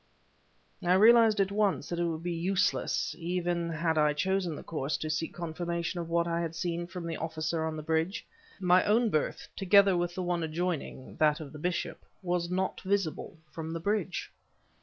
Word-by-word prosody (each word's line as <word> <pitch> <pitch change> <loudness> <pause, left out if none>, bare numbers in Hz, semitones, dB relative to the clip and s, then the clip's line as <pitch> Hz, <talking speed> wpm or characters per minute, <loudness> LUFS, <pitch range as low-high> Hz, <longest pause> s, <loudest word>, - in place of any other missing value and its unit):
I 175 +1 +3
realized 225 +2 +6
at 195 0 +2
once 205 -1 +1
that 175 - -3
it 175 - +1
would 165 -1 -3
be 175 0 -2
useless, 185 +3 0
even 175 0 -1
had 160 0 0
I 150 -1 +4
chosen 185 +1 0
the - - -8
course, 150 -3 -2
to 155 - -3
seek 160 +1 -2
confirmation 170 +1 -3
of 165 -1 -5
what 170 0 +1
I 170 0 0
had 165 -1 -3
seen 170 0 -2
from 180 -1 -7
the 165 - -3
officer 160 0 -2
on 160 0 -3
the 155 - -6
bridge: 160 +4 -1 0.3
my 180 -1 +4
own 225 +1 +3
berth, 155 - -1
together 195 0 +5
with 175 0 -1
the 185 - -2
one 175 -1 0
adjoining 160 -4 -3
that 150 -1 +3
of 150 -3 -8
the 150 - -8
bishop 175 +2 -2 0.2
was 175 -1 -1
not 185 +1 -1
visible 190 -4 -1
from 160 0 -5
the 165 - -3
bridge. 195 0 -2
170 Hz, 190 wpm, -30 LUFS, 160-185 Hz, 0.3 s, realized